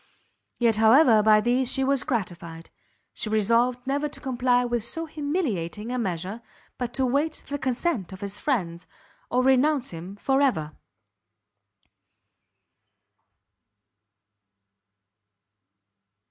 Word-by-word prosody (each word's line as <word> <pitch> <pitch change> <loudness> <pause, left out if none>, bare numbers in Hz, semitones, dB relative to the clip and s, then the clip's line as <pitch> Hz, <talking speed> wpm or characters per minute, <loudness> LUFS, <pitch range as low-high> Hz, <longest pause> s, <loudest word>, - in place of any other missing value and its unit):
Yet 230 -3 +2
however 225 +1 +6
by 215 0 +5
these 245 +3 +1
she 270 - 0
was 275 0 +1
gratified, 170 -7 -4 0.4
she 215 - -4
resolved 235 +4 +1
never 285 +2 -1
to - - -10
comply 250 -2 +1
with 240 -2 -1
so 325 +8 -3
humiliating 275 - -3
a 250 - -2
measure, 190 +1 -3 0.4
but 245 -2 -3
to 265 - +1
wait 285 +5 -1
the 285 0 -3
consent 255 - -1
of 190 - -10
his 200 0 -6
friends, 180 - -2 0.4
or 250 +1 +1
renounce 265 +1 +2
him 175 +4 -8
for 270 +6 +1
ever. 155 - 0
240 Hz, 110 wpm, -25 LUFS, 205-270 Hz, 0.4 s, however